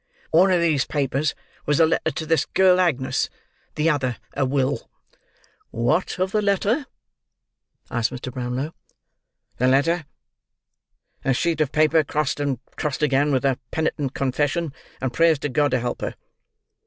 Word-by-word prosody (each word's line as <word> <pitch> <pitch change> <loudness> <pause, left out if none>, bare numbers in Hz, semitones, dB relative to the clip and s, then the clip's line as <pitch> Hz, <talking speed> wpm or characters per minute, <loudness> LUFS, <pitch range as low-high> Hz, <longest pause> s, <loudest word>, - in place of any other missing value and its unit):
One 180 +4 +5
of 180 - +4
these 155 -5 +2
papers 145 +1 -1 0.3
was 145 -1 +2
a 165 - +7
letter 160 0 +1
to 160 - -4
this 165 0 +1
girl 185 -1 +4
Agnes; 130 -7 0 0.5
the 155 +1 +1
other 130 -6 +1 0.2
a 140 - +1
will." 135 +1 -1 0.8
"What 135 +10 0
of 185 +1 0
the 215 - +1
letter?" 205 +7 +1 1.0
asked 120 -1 +1
Mr. 125 0 -7
Brownlow. 130 +5 -3 0.8
"The 125 - +2
letter?—A 140 -2 -3
sheet 165 +2 0
of 145 -3 +1
paper 155 +1 +4
crossed 150 0 -1
and 140 -3 0 0.2
crossed 150 0 -2
again, 145 0 +3
with 135 0 +1
a 135 -2 +1
penitent 150 -4 -2
confession, 145 +4 0 0.3
and 130 -2 -2
prayers 165 -2 +4
to 145 - -3
God 145 +3 +2
to 130 -1 +1
help 120 0 -3
her. - - -3
145 Hz, 150 wpm, -23 LUFS, 130-165 Hz, 1.0 s, a